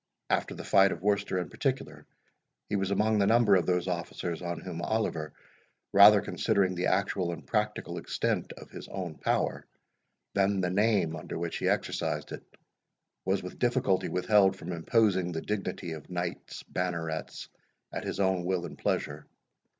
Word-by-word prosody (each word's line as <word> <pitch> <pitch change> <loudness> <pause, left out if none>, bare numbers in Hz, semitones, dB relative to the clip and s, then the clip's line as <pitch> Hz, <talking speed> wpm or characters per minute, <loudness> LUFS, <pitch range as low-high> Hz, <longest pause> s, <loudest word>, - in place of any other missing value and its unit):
After - - 0
the - - -7
fight 95 0 +5
of 85 - -5
Worcester, 100 -2 +1
in 90 -4 -3
particular, - - -3 0.6
he 105 - 0
was 95 -1 0
among 105 +2 +2
the 100 - +3
number 110 -2 +5
of 90 - +2
those 90 0 +1
officers 85 -1 -3
on 85 -1 -3
whom 85 -2 -6
Oliver, 85 -7 -1 0.6
rather 100 +1 +9
considering 100 -3 +1
the 90 0 -1
actual 95 -3 +1
and 85 - -8
practical 105 -1 -1
extent - - -1
of - - -13
his - - -9
own 90 -5 -6
power, - - 0 0.7
than 100 0 +2
the 90 -1 0
name 100 -5 +2
under 80 +1 -6
which 85 0 -3
he - - +1
exercised - - -1
it, - - -6 0.8
was 95 0 +1
with 90 - -8
difficulty 120 -6 +1
withheld 95 +1 +4
from 90 -2 -7
imposing 95 +1 +2
the 80 - -3
dignity 100 -4 -3
of 80 -2 -8
Knights 90 -1 -4
Bannerets 85 -3 -3 0.5
at - - -3
his - - -4
own 95 -2 +2
will 90 -1 -1
and - - -9
pleasure. 75 +1 -2
95 Hz, 165 wpm, -29 LUFS, 85-100 Hz, 0.8 s, rather